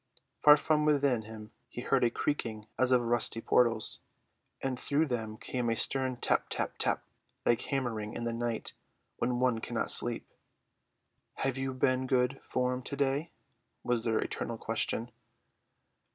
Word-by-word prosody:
From 150 Hz, 0 st, +9 dB
far 150 Hz, 0 st, +2 dB
within 140 Hz, -5 st, +3 dB
him 110 Hz, -1 st, -10 dB, 0.2 s
he 120 Hz, -, -6 dB
heard 130 Hz, 0 st, +2 dB
a 120 Hz, -, +5 dB
creaking 115 Hz, -5 st, -2 dB
as 130 Hz, 0 st, +3 dB
of 125 Hz, -1 st, +5 dB
rusty 120 Hz, -1 st, +1 dB
portals, 115 Hz, -1 st, +2 dB, 0.6 s
and 130 Hz, -2 st, -2 dB
through 145 Hz, +3 st, +1 dB
them 110 Hz, -5 st, -3 dB
came 125 Hz, 0 st, -2 dB
a 115 Hz, -, +1 dB
stern 130 Hz, +2 st, 0 dB
tap -, -, +1 dB
tap -, -, -2 dB
tap, -, -, +1 dB, 0.4 s
like 120 Hz, -, +3 dB
hammering 115 Hz, -6 st, -2 dB
in 120 Hz, -, -4 dB
the 115 Hz, 0 st, -1 dB
night 115 Hz, -1 st, -3 dB, 0.4 s
when 125 Hz, 0 st, 0 dB
one 125 Hz, -3 st, +2 dB
cannot -, -, 0 dB
sleep. -, -, 0 dB, 1.1 s
"Have 135 Hz, -1 st, -1 dB
you 135 Hz, 0 st, -1 dB
been 130 Hz, 0 st, +1 dB
good 130 Hz, +1 st, +1 dB
form 125 Hz, 0 st, -1 dB
to 140 Hz, -, -5 dB
day?" 140 Hz, +3 st, 0 dB, 0.5 s
was 120 Hz, -2 st, 0 dB
their 115 Hz, -1 st, +1 dB
eternal 115 Hz, -, -3 dB
question. 115 Hz, +2 st, -1 dB
125 Hz, 150 wpm, -31 LUFS, 115-135 Hz, 1.1 s, From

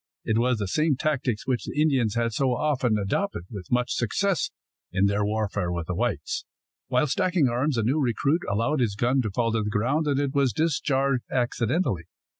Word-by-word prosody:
It 110 Hz, 0 st, +1 dB
was 125 Hz, 0 st, +2 dB
the 100 Hz, -2 st, -2 dB
same 150 Hz, -, +2 dB
tactics 130 Hz, -6 st, -1 dB
which 125 Hz, -2 st, -1 dB
the -, -, -4 dB
Indians 135 Hz, -8 st, +2 dB
had 115 Hz, -1 st, 0 dB
so 130 Hz, +1 st, +1 dB
often 130 Hz, -6 st, +1 dB
adopted 105 Hz, -, -1 dB
with 100 Hz, -5 st, -8 dB
much 125 Hz, 0 st, +1 dB
success 185 Hz, -, 0 dB, 0.4 s
in 95 Hz, +1 st, +2 dB
their 100 Hz, +1 st, +1 dB
warfare 105 Hz, -3 st, -1 dB
with 85 Hz, -2 st, -3 dB
the 90 Hz, -, -3 dB
whites. -, -, -2 dB, 0.4 s
While 155 Hz, -, +2 dB
stacking 175 Hz, 0 st, +2 dB
arms, 125 Hz, +3 st, 0 dB
a 115 Hz, -, +1 dB
new 135 Hz, +8 st, +1 dB
recruit 140 Hz, +5 st, +1 dB
allowed 115 Hz, +8 st, +1 dB
his 110 Hz, -5 st, +1 dB
gun 125 Hz, +5 st, +2 dB
to 110 Hz, -, -2 dB
fall 115 Hz, +3 st, 0 dB
to 115 Hz, 0 st, 0 dB
the 105 Hz, -, -2 dB
ground, 130 Hz, +9 st, 0 dB
and 140 Hz, -1 st, +1 dB
it 140 Hz, -1 st, -1 dB
was 140 Hz, -5 st, +2 dB
discharged 140 Hz, -3 st, +1 dB
accidentally. 120 Hz, -, 0 dB
125 Hz, 195 wpm, -26 LUFS, 110-145 Hz, 0.4 s, was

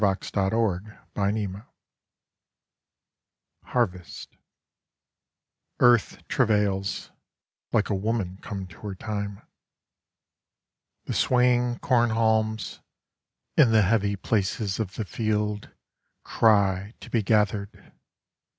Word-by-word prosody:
1917. 100 Hz, +1 st, 0 dB, 0.6 s
At 105 Hz, -, -15 dB, 2.0 s
Harvest 90 Hz, -8 st, -2 dB
By -, -, -34 dB
Joseph -, -, -59 dB
Campbell 120 Hz, 0 st, +7 dB
EARTH 115 Hz, -, -2 dB
travails, 105 Hz, -5 st, 0 dB, 0.6 s
Like 110 Hz, -2 st, +1 dB
a -, -, +2 dB
woman 100 Hz, -2 st, -2 dB
come 100 Hz, -2 st, -5 dB
to 90 Hz, -3 st, -15 dB
her 100 Hz, -3 st, -6 dB
time. 100 Hz, 0 st, -5 dB, 1.6 s
The -, -, -3 dB
swaying 125 Hz, -1 st, +2 dB
corn 120 Hz, -2 st, +3 dB
haulmsIn 110 Hz, -1 st, 0 dB, 0.8 s
the 110 Hz, -7 st, +6 dB
heavy 100 Hz, 0 st, +1 dB
places 100 Hz, 0 st, -1 dB
of 105 Hz, -3 st, -3 dB
the 110 Hz, -, -3 dB
fieldCry 105 Hz, -1 st, -1 dB
to -, -, -11 dB
be 115 Hz, -, +2 dB
gathered. 105 Hz, -1 st, 0 dB
105 Hz, 90 wpm, -26 LUFS, 100-115 Hz, 2.0 s, Campbell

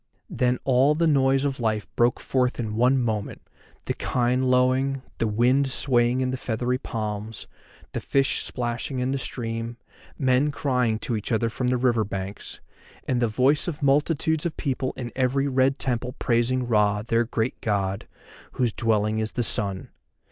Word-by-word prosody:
Then 125 Hz, 0 st, +1 dB
all 135 Hz, +3 st, +3 dB
the 165 Hz, +2 st, +2 dB
noise 135 Hz, -2 st, +3 dB
of 135 Hz, -1 st, -2 dB
life 110 Hz, -3 st, -1 dB
broke 120 Hz, +1 st, +2 dB
forth 125 Hz, -1 st, 0 dB
in 110 Hz, -2 st, -3 dB
one 125 Hz, +4 st, +3 dB
moment, 110 Hz, -4 st, -3 dB, 0.4 s
the -, -, -1 dB
kine 125 Hz, +1 st, 0 dB
lowing, 130 Hz, +1 st, +2 dB, 0.2 s
the 115 Hz, -, +1 dB
wind 125 Hz, +6 st, +2 dB
swaying 125 Hz, -1 st, +2 dB
the 130 Hz, -, -2 dB
feathery 125 Hz, +1 st, -2 dB
palms, 110 Hz, -3 st, -5 dB, 0.5 s
the -, -, -3 dB
fish 135 Hz, -1 st, +1 dB
splashing 120 Hz, +2 st, -3 dB
in 125 Hz, +1 st, 0 dB
the 135 Hz, -, -1 dB
stream, 115 Hz, -1 st, -4 dB, 0.4 s
men 130 Hz, +1 st, +2 dB
crying 125 Hz, -6 st, 0 dB
to 120 Hz, 0 st, -2 dB
each 105 Hz, +2 st, -4 dB
other 115 Hz, 0 st, +1 dB
from 125 Hz, +2 st, -2 dB
the 125 Hz, 0 st, +2 dB
river 120 Hz, -3 st, +2 dB
banks, 100 Hz, 0 st, -5 dB, 0.5 s
and 125 Hz, -1 st, 0 dB
the 120 Hz, -, +3 dB
voice 130 Hz, +9 st, +2 dB
of 155 Hz, -4 st, -4 dB
multitudes 150 Hz, +2 st, +2 dB
of 170 Hz, -, -3 dB
people 130 Hz, -2 st, -2 dB
in 120 Hz, -2 st, -5 dB
every 135 Hz, +2 st, +1 dB
red 135 Hz, +1 st, +2 dB
temple 125 Hz, 0 st, -2 dB
praising 125 Hz, +1 st, +1 dB
Ra, 105 Hz, -3 st, +2 dB
their 115 Hz, +1 st, +1 dB
great 115 Hz, 0 st, -2 dB
God, 100 Hz, -2 st, -1 dB, 0.5 s
whose 120 Hz, -4 st, 0 dB
dwelling 110 Hz, -1 st, +1 dB
is 110 Hz, 0 st, -3 dB
the 120 Hz, -, 0 dB
Sun. 100 Hz, -3 st, +1 dB
125 Hz, 165 wpm, -25 LUFS, 115-130 Hz, 0.5 s, all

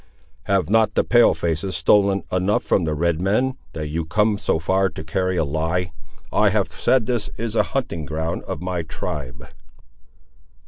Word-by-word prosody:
"Have 100 Hz, -1 st, +1 dB
not 110 Hz, +1 st, +2 dB
the -, -, +3 dB
pale 120 Hz, -6 st, +5 dB
faces 85 Hz, +3 st, -2 dB
stolen 100 Hz, +3 st, +3 dB
enough 95 Hz, +3 st, +1 dB
from 90 Hz, -, +1 dB
the 75 Hz, -1 st, -1 dB
red 85 Hz, +1 st, 0 dB
men, 110 Hz, +8 st, +1 dB, 0.2 s
that 75 Hz, -2 st, -4 dB
you 80 Hz, +2 st, -2 dB
come 105 Hz, +5 st, +1 dB
so 100 Hz, -, +1 dB
far 95 Hz, +4 st, +1 dB
to 80 Hz, -1 st, -8 dB
carry 95 Hz, +3 st, -1 dB
a 80 Hz, -, +2 dB
lie? 80 Hz, +5 st, -1 dB, 0.4 s
I -, -, +4 dB
have -, -, 0 dB
said 130 Hz, -4 st, +1 dB
that 125 Hz, -, 0 dB
this 115 Hz, -4 st, -2 dB
is 115 Hz, -1 st, -4 dB
a -, -, +5 dB, 0.2 s
hunting 85 Hz, -, -3 dB
ground 80 Hz, +3 st, -3 dB
of -, -, -5 dB
my 90 Hz, -2 st, -2 dB
tribe." 70 Hz, -6 st, -6 dB
90 Hz, 180 wpm, -22 LUFS, 80-105 Hz, 0.4 s, pale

